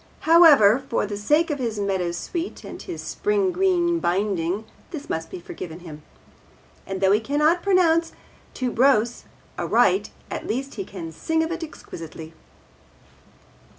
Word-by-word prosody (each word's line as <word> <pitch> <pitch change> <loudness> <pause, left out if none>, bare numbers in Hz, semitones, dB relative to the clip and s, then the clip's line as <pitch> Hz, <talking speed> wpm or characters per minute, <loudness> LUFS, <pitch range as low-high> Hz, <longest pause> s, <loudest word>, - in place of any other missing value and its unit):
However, 285 -9 +6
for 230 - 0
the 205 0 -5
sake 300 +11 +2
of 290 - -3
his 230 -4 -2
meadowsweet 195 - -3
and - - -8
his - - -7
spring 410 -2 0
green 350 -2 +2
binding 190 - -1 0.2
this 295 -3 -7
must 160 0 -3
be - - -7
forgiven 170 0 -8
him. 155 -3 -10 0.9
And 195 0 -4
though 190 0 +4
he 210 - +4
cannot 300 +8 +2
pronounce 340 -4 +3 0.4
'tuberose' 245 -2 +2 0.3
aright, 385 - +2 0.2
at - - -5
least 270 +4 -3
he 195 -4 -5
can 170 -4 -8
sing 320 - -1
of 320 - -3
it 340 0 -4
exquisitely. 165 - -9
245 Hz, 140 wpm, -23 LUFS, -, 0.9 s, However